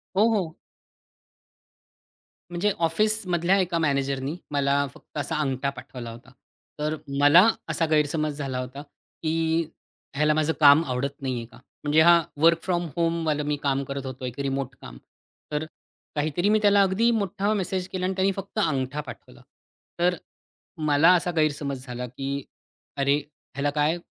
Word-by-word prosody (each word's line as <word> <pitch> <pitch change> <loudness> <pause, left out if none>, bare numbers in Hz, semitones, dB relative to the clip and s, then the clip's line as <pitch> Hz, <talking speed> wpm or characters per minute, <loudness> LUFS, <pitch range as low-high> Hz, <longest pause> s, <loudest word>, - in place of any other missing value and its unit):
हो, 210 +4 +5
हो. 175 -6 -2 2.0
म्हणजे 175 +4 +1
ऑफिसमधल्या 185 0 +2
एका 175 -2 0
मॅनेजरनी 140 -1 0 0.2
मला 140 0 +2
फक्त - - -14
असा 145 +2 -2
अंगठा 135 -1 -1
पाठवला 125 -3 -8
होता. 120 +3 -13 0.5
तर 150 +1 -1 0.2
मला 155 +8 +7 0.2
असा 165 - +1
गैरसमज 150 -1 +1
झाला 135 -3 -3
होता, 130 +2 -6
की 160 +2 -2 0.5
ह्याला 150 +2 +3
माझं 155 +1 +1
काम 145 +1 +7
आवडत 135 +2 -3
नाहीये 125 -3 -3
का? 120 - -17 0.3
म्हणजे 150 +1 +4
हा 170 +1 +7 0.2
वर्क 165 0 +5
फ्रॉम 175 -2 0
होमवालं 165 -3 0
मी 150 0 0
काम 140 -1 +1
करत 140 0 -5
होतो. 130 0 -6
एक 125 +1 -6
रिमोट 135 -2 -2
काम. - - -10 0.5
तर 150 +1 -1 0.5
काहीतरी 155 +6 0
मी 215 0 +4
त्याला 205 -1 +5
अगदी 195 +5 +3
मोठा 205 -1 0
मेसेज 185 -2 -2
केला 185 -1 -2
आणि 190 - 0
त्याने 190 +1 +2
फक्त 195 +2 -5
अंगठा 145 -5 0
पाठवला. 140 - -12 0.6
तर 180 +1 +3 0.7
मला 150 +4 +6
असा 175 0 0
गैरसमज 145 -4 -1
झाला, 125 0 -5
की 135 +2 -4 0.5
अरे! 140 0 +3 0.4
ह्याला 140 +2 0
काय 150 +3 +2
150 Hz, 145 wpm, -25 LUFS, 140-175 Hz, 2.0 s, मला